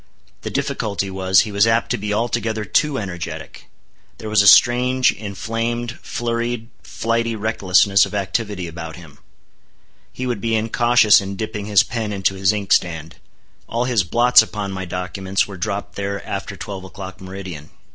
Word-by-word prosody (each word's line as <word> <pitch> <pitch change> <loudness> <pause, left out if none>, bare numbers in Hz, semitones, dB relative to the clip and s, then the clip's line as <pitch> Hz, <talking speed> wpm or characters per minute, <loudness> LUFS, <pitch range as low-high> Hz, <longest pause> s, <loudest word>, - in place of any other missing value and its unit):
The - - -5
difficulty 100 -2 -2
was, 95 0 +3
he 110 - -4
was 100 +2 +3
apt 115 +1 +1
to - - +1
be 105 +1 -3
altogether 110 0 -1
too 145 +6 +1
energetic. 85 -6 -7 0.5
There 110 - -7
was 105 -1 +5
a 100 - +3
strange, 125 +3 +5
inflamed, 115 +4 -4
flurried, 120 0 -3
flighty 115 0 -1
recklessness 100 -2 +3
of - - -8
activity 100 -1 -2
about 80 -1 -7
him. 80 -5 -14 0.9
He 130 - -5
would 120 -5 -2
be 115 +1 0
incautious 115 -1 +4
in 100 0 -5
dipping 105 0 -5
his 105 -3 +5
pen 115 -4 -4
into 95 -1 0
his 95 0 +2
inkstand. 85 -6 0 0.5
All 120 +1 0
his 120 -5 +1
blots 120 +7 +5
upon 105 -2 -4
my 95 -1 -4
documents, 95 +2 -2
were 100 - -8
dropped 100 +2 -4
there 100 0 -3
after - - -5
twelve 95 -2 -7
o'clock, 95 +1 -9
meridian. 95 -5 -8
100 Hz, 155 wpm, -20 LUFS, 95-115 Hz, 0.9 s, was